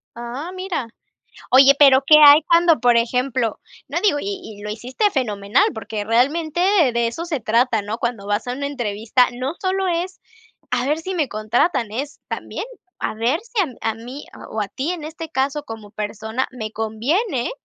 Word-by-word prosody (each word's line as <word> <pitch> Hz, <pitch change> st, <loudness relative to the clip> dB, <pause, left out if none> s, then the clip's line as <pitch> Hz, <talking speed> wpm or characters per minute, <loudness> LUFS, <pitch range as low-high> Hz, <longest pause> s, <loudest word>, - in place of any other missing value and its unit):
Ah, 240 Hz, +8 st, -6 dB
mira. 370 Hz, -10 st, -3 dB, 0.6 s
Oye, 270 Hz, +2 st, +7 dB
pero, 275 Hz, -2 st, +7 dB
¿qué 305 Hz, -, +8 dB
hay 290 Hz, +2 st, +9 dB
cuando, 335 Hz, -3 st, +4 dB
por 245 Hz, -1 st, +4 dB
ejemplo? 245 Hz, 0 st, 0 dB, 0.3 s
No -, -, -1 dB
digo, 395 Hz, -9 st, +2 dB
y 400 Hz, -1 st, -4 dB, 0.2 s
y -, -, -11 dB
lo 210 Hz, -, -5 dB
hiciste 255 Hz, -, -1 dB
fenomenal, 210 Hz, -, +1 dB
porque 215 Hz, -1 st, -5 dB
realmente 290 Hz, +9 st, +1 dB
de 365 Hz, -8 st, +4 dB
de 235 Hz, 0 st, +1 dB
eso 325 Hz, +9 st, -5 dB
se 315 Hz, -6 st, -3 dB
trata, 230 Hz, 0 st, +1 dB
¿no? 215 Hz, +3 st, -5 dB
Cuando 235 Hz, -4 st, -3 dB
vas 205 Hz, +3 st, -1 dB
a 245 Hz, -, -2 dB
una 280 Hz, +3 st, -3 dB
entrevista, 240 Hz, -2 st, +1 dB
no 255 Hz, +5 st, -4 dB
sólo 380 Hz, 0 st, 0 dB
es: 355 Hz, +2 st, -2 dB, 0.5 s
"A 250 Hz, +1 st, 0 dB
ver 300 Hz, +2 st, +1 dB
si 375 Hz, +4 st, -5 dB
me 310 Hz, -6 st, 0 dB
contratan", 220 Hz, +3 st, 0 dB
es 275 Hz, +7 st, -5 dB
también, -, -, -5 dB, 0.3 s
a -, -, -3 dB
ver 235 Hz, +8 st, 0 dB
si 455 Hz, -1 st, -3 dB
a 250 Hz, -7 st, -3 dB
a -, -, -5 dB
mí, 245 Hz, +6 st, -9 dB, 0.3 s
o 220 Hz, -, -3 dB
a 205 Hz, -, -2 dB
ti, 275 Hz, +9 st, -3 dB
en 340 Hz, -4 st, -6 dB
este 325 Hz, +1 st, -7 dB
caso 275 Hz, +1 st, -1 dB
como 220 Hz, -4 st, -9 dB
persona 220 Hz, +4 st, -3 dB
me 220 Hz, -4 st, -5 dB
conviene 240 Hz, -, -1 dB
255 Hz, 185 wpm, -21 LUFS, 225-315 Hz, 0.6 s, hay